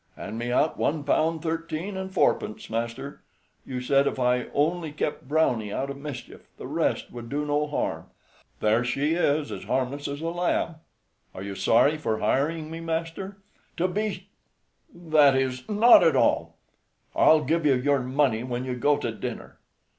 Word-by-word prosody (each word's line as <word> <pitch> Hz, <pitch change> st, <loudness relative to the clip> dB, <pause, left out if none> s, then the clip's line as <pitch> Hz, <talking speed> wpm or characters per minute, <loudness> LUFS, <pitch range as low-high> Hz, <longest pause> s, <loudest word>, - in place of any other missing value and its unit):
"Hand 110 Hz, +2 st, -6 dB
me 120 Hz, +1 st, -3 dB
out 150 Hz, +5 st, +1 dB
one 150 Hz, 0 st, 0 dB
pound 160 Hz, +2 st, +1 dB
thirteen 165 Hz, +3 st, -3 dB
and 190 Hz, 0 st, -5 dB
fourpence, 145 Hz, -, 0 dB
master. 115 Hz, +5 st, -4 dB, 0.5 s
You 125 Hz, -1 st, -4 dB
said 140 Hz, +2 st, +3 dB
if -, -, -2 dB
I 125 Hz, -1 st, +1 dB
only 160 Hz, +2 st, 0 dB
kept 150 Hz, -2 st, -3 dB
Browney 125 Hz, -9 st, +1 dB
out 140 Hz, +6 st, -2 dB
of 140 Hz, -, -7 dB
mischief, 145 Hz, -1 st, -9 dB
the -, -, -8 dB
rest -, -, -1 dB
would, 120 Hz, -1 st, -8 dB
do 145 Hz, +1 st, -2 dB
no 150 Hz, 0 st, 0 dB
harm. 150 Hz, -, -3 dB, 0.5 s
There 110 Hz, +3 st, +3 dB
she 140 Hz, +5 st, 0 dB
is 150 Hz, -3 st, +1 dB
as -, -, -7 dB
harmless 135 Hz, +2 st, -1 dB
as 145 Hz, +1 st, -5 dB
a 165 Hz, -, -2 dB
lamb. 170 Hz, -1 st, -1 dB, 0.6 s
Are 95 Hz, -, -6 dB
you 100 Hz, 0 st, -5 dB
sorry 130 Hz, +9 st, +3 dB
for 110 Hz, -7 st, -1 dB
hiring 155 Hz, +8 st, 0 dB
me, 165 Hz, -, -6 dB
master?" 165 Hz, +4 st, -4 dB, 0.4 s
"To 180 Hz, -, +2 dB
be 210 Hz, +3 st, -3 dB, 0.6 s
that 155 Hz, -5 st, +4 dB
is, 130 Hz, +1 st, -2 dB
not 220 Hz, +3 st, +7 dB
at -, -, +4 dB
all. -, -, +2 dB, 0.6 s
I'll 155 Hz, -1 st, +5 dB
give 165 Hz, +4 st, 0 dB
you 145 Hz, -3 st, +4 dB
your 140 Hz, +2 st, +2 dB
money 130 Hz, -2 st, +1 dB
when 125 Hz, 0 st, -3 dB
you 130 Hz, -, -3 dB
go 145 Hz, +4 st, +2 dB
to 120 Hz, -5 st, -3 dB
dinner. 110 Hz, -, -7 dB
145 Hz, 170 wpm, -26 LUFS, 125-165 Hz, 0.6 s, not